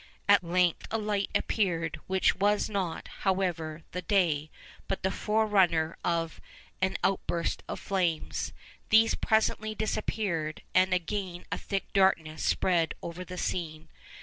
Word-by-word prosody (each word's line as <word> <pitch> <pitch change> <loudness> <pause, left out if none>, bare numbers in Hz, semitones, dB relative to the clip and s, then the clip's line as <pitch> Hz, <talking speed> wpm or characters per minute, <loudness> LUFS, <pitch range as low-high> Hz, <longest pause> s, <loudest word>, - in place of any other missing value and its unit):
At 205 -2 +6
length 175 0 +1
a 225 - 0
light 210 -2 -1
appeared, 165 -6 0
which 190 0 +3
was 205 +2 +1
not, 185 -5 -2
however, 175 -5 -1
the 180 - -3
day, 165 -6 +1 0.4
but 195 - -3
the 190 - +1
forerunner 195 -7 +2
of 165 -1 -1 0.4
an 185 0 +1
outburst 175 -3 0
of - - -4
flames. 180 -5 -1 0.4
These 225 +1 +6
presently 220 0 +1
disappeared, 200 -7 -2
and 185 0 +4
again 180 0 -2
a - - 0
thick 195 -1 -4
darkness 165 -6 +2
spread 170 -3 +2
over 170 +2 -5
the 180 0 -8
scene. 160 -3 -3
185 Hz, 130 wpm, -29 LUFS, 165-200 Hz, 0.4 s, At